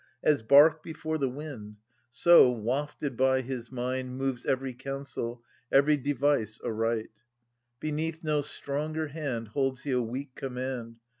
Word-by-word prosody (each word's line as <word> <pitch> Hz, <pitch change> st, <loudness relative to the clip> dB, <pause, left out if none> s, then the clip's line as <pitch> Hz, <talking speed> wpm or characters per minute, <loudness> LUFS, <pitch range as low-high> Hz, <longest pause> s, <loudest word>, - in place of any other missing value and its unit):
As 150 Hz, -5 st, +3 dB
bark 145 Hz, +6 st, +6 dB
before 160 Hz, 0 st, -4 dB
the 135 Hz, -2 st, +1 dB
wind, 125 Hz, -7 st, -8 dB, 0.3 s
So, 130 Hz, +1 st, +7 dB
wafted 130 Hz, +4 st, -2 dB
by 130 Hz, +1 st, +3 dB
his 125 Hz, -2 st, -6 dB
mind, 130 Hz, 0 st, -3 dB
Moves 135 Hz, -2 st, -2 dB
every 130 Hz, 0 st, 0 dB
counsel, 130 Hz, -2 st, -5 dB, 0.3 s
each 140 Hz, +1 st, +4 dB
device 140 Hz, -5 st, +1 dB
aright. 115 Hz, 0 st, -1 dB, 0.7 s
Beneath 160 Hz, +2 st, -3 dB
no 150 Hz, -2 st, +1 dB
stronger 150 Hz, +2 st, -3 dB
hand 135 Hz, -7 st, -4 dB
Holds 135 Hz, +2 st, -1 dB
he 145 Hz, -, -2 dB
a 125 Hz, -1 st, +2 dB
weak 130 Hz, +4 st, -5 dB
command. 125 Hz, -3 st, -5 dB
135 Hz, 135 wpm, -29 LUFS, 125-145 Hz, 0.7 s, So